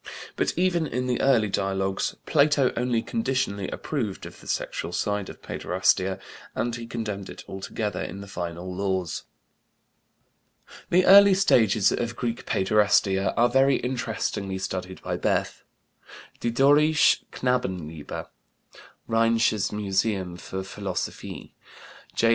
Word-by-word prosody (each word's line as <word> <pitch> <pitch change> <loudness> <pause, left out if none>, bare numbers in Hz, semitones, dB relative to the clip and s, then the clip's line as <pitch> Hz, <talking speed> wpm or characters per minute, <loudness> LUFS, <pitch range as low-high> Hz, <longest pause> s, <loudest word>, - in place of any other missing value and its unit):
But - - -1
even 175 -3 +2
in 125 -2 -2
the 125 -1 0
early 125 -6 +4
dialogues 95 -1 -1
Plato 145 -3 +3
only 120 -1 0
conditionally 130 - -1
approved 115 -11 -4
of - - -11
the - - -14
sexual - - -3
side 105 +2 -1
of - - -12
paiderastia 95 +1 0 0.4
and 120 0 -1
he 115 -1 -7
condemned 105 -4 -4
it - - -9
altogether 105 +2 -4
in 100 - -5
the 100 - -8
final 90 -1 -5
Laws. 95 -2 -2 1.6
The 180 +1 +4
early 200 0 +8
stages 110 - +4
of 115 -1 -2
Greek 120 -1 -4
paiderastia 100 -1 +2
are 120 +1 +5
very 135 +2 +4
interestingly 115 -6 -2
studied 95 0 -5
by - - -2
Bethe, - - -1 0.8
"Die 120 - -1
Dorische 145 +5 +4
Knabenliebe," 90 - -3 0.8
Rheinisches 115 -2 +2
Museum 95 -2 -1
für 95 +2 -6
Philologie, - - -5 0.6
1907. 115 - +3
110 Hz, 120 wpm, -25 LUFS, 95-125 Hz, 1.6 s, early